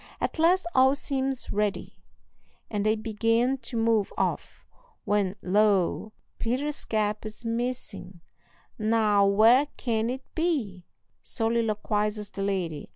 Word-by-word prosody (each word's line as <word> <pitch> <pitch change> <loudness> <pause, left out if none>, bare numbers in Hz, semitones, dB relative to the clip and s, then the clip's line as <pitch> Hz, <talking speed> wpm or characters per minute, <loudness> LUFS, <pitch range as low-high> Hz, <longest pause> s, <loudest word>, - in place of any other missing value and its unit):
At - - -3
last 350 +3 +4
all 265 +1 +5
seems 270 -2 -3
ready, 210 -1 -2 0.8
and 205 -2 -1
they 215 +1 +2
begin 230 +4 0
to 235 0 -6
move 225 -3 +2
off, - - -2 0.4
when 205 -2 +1
lo! 205 +1 +2 0.3
Peter's 275 +6 -2
cap 210 -1 -1
is 215 +2 -9
missing. 230 -6 -4 0.6
"Now, 215 -2 +3
where 225 +8 +5
can 225 -2 -1
it 260 +1 -4
be?" 260 - -2 0.3
soliloquizes 215 -2 -1
the 195 - -6
lady. 180 -7 -2
220 Hz, 115 wpm, -27 LUFS, 205-245 Hz, 0.8 s, all